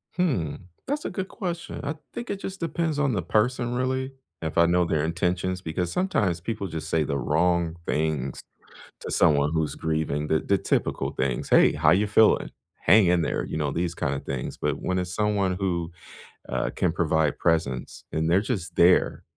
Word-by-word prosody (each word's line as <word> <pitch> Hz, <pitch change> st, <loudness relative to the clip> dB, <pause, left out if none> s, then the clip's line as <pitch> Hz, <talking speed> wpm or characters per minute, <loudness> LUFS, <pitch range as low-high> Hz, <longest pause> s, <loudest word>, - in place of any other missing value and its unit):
Hmm. 140 Hz, -, 0 dB, 0.3 s
That's 290 Hz, +2 st, -2 dB
a -, -, -1 dB
good 190 Hz, -1 st, -4 dB
question. 175 Hz, -4 st, -5 dB
I 145 Hz, +2 st, -2 dB, 0.2 s
think 240 Hz, -, -6 dB
it 200 Hz, -, -3 dB
just 195 Hz, 0 st, -6 dB
depends 165 Hz, -2 st, -1 dB
on 145 Hz, -2 st, +2 dB
the 100 Hz, -, 0 dB
person, 120 Hz, +6 st, 0 dB
really, 130 Hz, +1 st, -1 dB, 0.3 s
if 80 Hz, -1 st, -4 dB
I 85 Hz, -, +6 dB
know 90 Hz, +1 st, +3 dB
their 80 Hz, -3 st, 0 dB
intentions 90 Hz, +2 st, -1 dB
because 85 Hz, +1 st, -2 dB
sometimes 105 Hz, -, 0 dB
people 105 Hz, +2 st, -4 dB
just 80 Hz, -2 st, -6 dB
say 80 Hz, -1 st, +2 dB
the 70 Hz, -1 st, -2 dB
wrong 85 Hz, +3 st, +1 dB
things 75 Hz, -4 st, -1 dB, 0.6 s
to -, -, -6 dB
someone 75 Hz, -1 st, +3 dB
who's 80 Hz, -3 st, 0 dB
grieving, 80 Hz, -2 st, -2 dB
the 80 Hz, -, +2 dB
the 100 Hz, -, +1 dB
typical -, -, -1 dB
things. 65 Hz, -2 st, -2 dB
"Hey, -, -, +6 dB
how -, -, +3 dB
ya 100 Hz, +4 st, +3 dB
feeling? 110 Hz, +1 st, +4 dB, 0.3 s
Hang 100 Hz, +3 st, +6 dB
in 90 Hz, 0 st, +3 dB
there." -, -, -1 dB
You -, -, -5 dB
know, 75 Hz, -2 st, 0 dB
these 85 Hz, +3 st, -2 dB
kinda 70 Hz, -2 st, -2 dB
things. 70 Hz, -3 st, -5 dB
But -, -, -1 dB
when 90 Hz, 0 st, 0 dB
it's 90 Hz, -1 st, -3 dB
someone 100 Hz, -3 st, +1 dB
who, 90 Hz, -3 st, -2 dB, 0.6 s
uh, -, -, -1 dB
can 90 Hz, -, +1 dB
provide 80 Hz, -2 st, +1 dB
presence 80 Hz, -7 st, -1 dB
and 80 Hz, +1 st, 0 dB
they're 90 Hz, +3 st, +4 dB
just 95 Hz, -7 st, -3 dB
there, 90 Hz, +2 st, +4 dB
90 Hz, 185 wpm, -25 LUFS, 80-110 Hz, 0.6 s, I